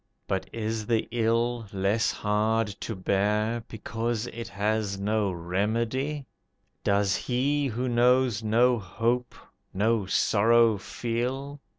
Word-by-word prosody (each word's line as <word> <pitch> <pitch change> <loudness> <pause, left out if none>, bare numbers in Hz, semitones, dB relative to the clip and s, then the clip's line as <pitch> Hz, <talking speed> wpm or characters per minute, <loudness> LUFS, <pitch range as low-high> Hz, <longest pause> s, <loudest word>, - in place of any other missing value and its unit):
But 95 -1 -2
is 110 -1 -3
the 115 -2 +1
ill 115 0 0
less 100 +4 +1
hard 110 +1 0
to 115 - -4
bear, 105 +4 0
Because 115 +1 -3
it 115 -1 -6
has 100 0 -1
no 105 0 0
remedy? 115 - -1 0.6
Does 100 -1 +2
he 140 +3 0
who 125 +1 -2
knows 120 -1 +3
no 120 +3 +3
hope 115 +6 -1 0.4
no 105 0 +1
sorrow 115 +2 +4
feel? 130 +7 -3
115 Hz, 110 wpm, -27 LUFS, 105-120 Hz, 0.6 s, sorrow